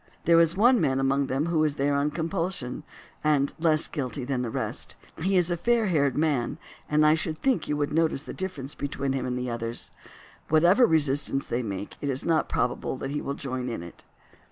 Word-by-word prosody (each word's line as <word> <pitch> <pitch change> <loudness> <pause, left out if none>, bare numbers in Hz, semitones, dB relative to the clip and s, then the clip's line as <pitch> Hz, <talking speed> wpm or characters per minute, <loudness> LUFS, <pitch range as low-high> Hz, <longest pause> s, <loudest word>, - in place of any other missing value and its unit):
There 170 -1 +6
is 170 +2 +3
one 240 +2 +5
man 135 0 +1
among 135 +1 +1
them 135 +3 0
who 165 -2 +1
is 150 -2 0
there 140 +1 +1
on 140 +1 +1
compulsion, 165 -4 -3 0.4
and 145 -2 +2
is - - -10
less 155 -1 +3
guilty 135 -2 -4
than 130 0 -1
the 120 - -2
rest. - - -4 0.3
He 190 +3 +2
is 180 -1 +2
a - - +2
fair 230 +2 +2
haired 140 -6 +1
man, 145 -6 0 0.3
and 150 0 +4
I 150 - +6
should 160 0 -1
think 260 - 0
you 150 - -1
would 145 0 -1
notice 160 -3 +1
the - - -7
difference 155 -8 -5
between 140 -1 -3
him 135 -1 -2
and 125 0 -2
the 125 -1 -3
others. 115 0 -3 0.6
Whatever 175 +10 +5
resistance 145 -4 +1
they 120 - -1
make 100 -3 -5
it 145 - -2
is 135 0 -1
not 160 -2 +1
probable 125 +1 -1
that 135 +1 -5
he 150 - -2
will 140 - -3
join 130 -3 -4
in 115 -7 -5
it. 85 - -12
145 Hz, 215 wpm, -26 LUFS, 135-165 Hz, 0.6 s, There